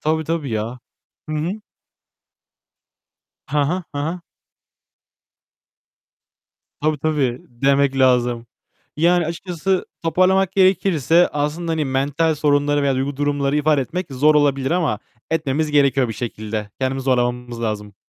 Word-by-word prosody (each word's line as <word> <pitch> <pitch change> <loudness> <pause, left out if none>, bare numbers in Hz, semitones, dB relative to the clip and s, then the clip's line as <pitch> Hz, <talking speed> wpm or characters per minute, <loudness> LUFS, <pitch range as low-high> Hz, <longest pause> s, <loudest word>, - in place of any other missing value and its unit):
Tabii, 160 +1 0
tabii 155 -4 -2
ya. 115 +3 -3 0.5
Hı 155 - -2
hı. 175 +8 -3 1.9
Hı 150 +1 -1
hı, 175 +6 0
hı 145 - -3
hı. 165 +5 -3 2.6
Tabii, 155 -1 0
tabii 140 -5 0
demek 135 +2 +1
lazım. 120 -2 +2 0.5
Yani 170 +1 +3
açıkçası 180 +2 -2 0.2
toparlamak 185 +3 +2
gerekirse 185 -4 +3
aslında 150 +3 -2
hani 155 -2 0
mental 140 +4 0
sorunları 145 -1 +2
veya 140 -1 +2
duygu 135 +2 -2
durumları 145 0 0
ifade 150 -1 +2
etmek 180 +8 -3
zor 150 +4 +4
olabilir 140 -2 +2
ama 160 - +1 0.3
etmemiz 155 -1 0
gerekiyor 140 -3 +3
bir 110 - -3
şekilde. 110 -2 -5
Kendimizi 130 0 -1
zorlamamız 125 -2 -1
lazım. 105 -2 -3
145 Hz, 120 wpm, -20 LUFS, 130-160 Hz, 2.6 s, zor